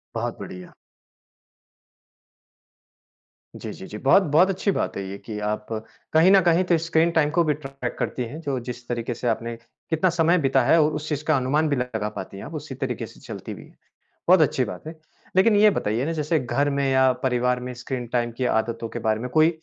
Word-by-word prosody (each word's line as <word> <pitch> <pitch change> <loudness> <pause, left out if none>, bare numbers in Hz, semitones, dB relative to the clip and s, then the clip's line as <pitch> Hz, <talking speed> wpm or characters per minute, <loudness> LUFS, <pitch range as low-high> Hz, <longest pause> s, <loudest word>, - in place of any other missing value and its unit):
बहुत - - -3
बढ़िया। 90 -1 -9 2.8
जी, - - -6
जी, - - -10
जी, 105 - -7
बहुत 140 - +5
बहुत 180 +5 +6
अच्छी 195 +1 0
बात - - -2
है 100 - -3
ये 100 - -6
कि 105 0 -7
आप 105 0 -2 0.5
कहीं 165 +4 +6
न 195 - +8
कहीं 175 0 +3
तो 180 -1 +2
इस 165 0 -2
स्क्रीन 165 +1 +3
टाइम 160 -3 +2
को 170 - +6
भी 150 -2 +2
ट्रैक 135 -3 -6
करती 125 - -2
हैं 145 +8 -8
जो 140 -5 -2
जिस 120 -1 -7
तरीके 120 0 -2
से 120 +1 -4
आपने 115 +1 -1 0.3
कितना 165 +3 +2
समय 170 +1 +3
बिताया 155 +2 +3
और 150 - +3
उस 150 0 -5
चीज़ 150 -1 -2
का 155 -3 +4
अनुमान 145 +5 +1
भी 140 - +2
लगा 115 -5 -2
पाती 100 - -8
हैं। - - -8
आप 150 - -9
उसी 150 -3 -6
तरीके 125 -2 -3
से - - -15
चलती - - -7
भी - - -11
हैं। - - -20 0.5
बहुत 185 -1 +7
अच्छी 135 -3 +2
बात 105 +9 -8
है। 160 - -6 0.4
लेकिन 205 +3 +5
ये 210 +1 +7
बताइए 120 - -1
ना 165 - -1
जैसे 155 0 0
घर 140 +3 0
में 140 -1 0
या 130 0 +5
परिवार 125 -1 +1
में 125 0 -6
स्क्रीन 125 0 -5
टाइम 120 -1 +1
की 130 - 0
आदतों 115 0 -1
के - - -5
बारे 110 0 0
में 125 - -4
कोई 155 +5 +4
135 Hz, 215 wpm, -24 LUFS, 120-160 Hz, 2.8 s, न